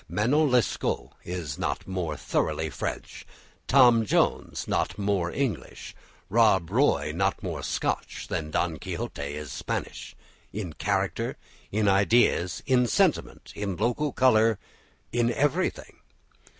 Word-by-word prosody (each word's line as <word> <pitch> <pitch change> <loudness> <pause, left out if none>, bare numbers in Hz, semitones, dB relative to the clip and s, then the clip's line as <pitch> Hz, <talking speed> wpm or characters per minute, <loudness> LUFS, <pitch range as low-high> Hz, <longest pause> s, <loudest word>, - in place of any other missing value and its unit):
"Manon 145 +8 +2
Lescaut" 125 -2 0
is 85 -6 -5
not - - -2
more 90 -5 -3
thoroughly 80 -1 -1
French, - - -5 0.4
"Tom 120 -4 +6
Jones" 105 - 0
not 95 - -1
more 100 -4 0
English, 115 - -4 0.3
"Rob 95 -5 +3
Roy" 95 - +2
not 95 +2 0
more - - -4
Scotch, - - -3
than 75 -1 -3
"Don 80 0 -1
Quixote" - - -5
is 75 +1 -5
Spanish, - - -5 0.4
in 95 -6 -5
character, - - -1 0.3
in 105 0 +1
ideas, 100 -3 +3
in 125 -2 +3
sentiment, - - 0
in 100 -2 -3
local 120 - 0
colour, 115 -5 +4 0.5
in 120 +1 +1
everything. 145 +8 -1
105 Hz, 120 wpm, -27 LUFS, 85-120 Hz, 0.5 s, Tom